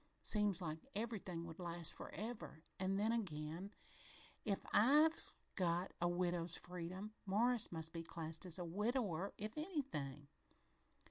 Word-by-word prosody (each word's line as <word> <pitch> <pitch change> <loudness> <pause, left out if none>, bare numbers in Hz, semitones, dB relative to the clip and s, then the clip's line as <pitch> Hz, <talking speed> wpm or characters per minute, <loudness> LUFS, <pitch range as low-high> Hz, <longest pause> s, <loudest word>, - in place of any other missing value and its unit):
Seem 210 -1 +4
like 160 -3 -2 0.2
everything 200 -6 -2
would 165 +1 -8
last 170 -2 0
forever 215 -8 -5 0.2
an' 190 +1 +2
then 215 +3 +3
again, 175 -3 -2 0.7
if 200 -3 0
I've 300 +8 +6 0.2
got 175 -1 +1
a 175 - +4
widow's 175 -1 +1
freedom, 180 +4 -5
Morris 230 +4 +4
must 160 -1 -2
be 165 - -2
classed 165 -1 -5
as 175 - -1
a 175 - -2
widower, 200 -1 0
if 215 +2 -3
he's 305 +5 -2
anything. 150 - -2
185 Hz, 135 wpm, -41 LUFS, 165-215 Hz, 0.7 s, I've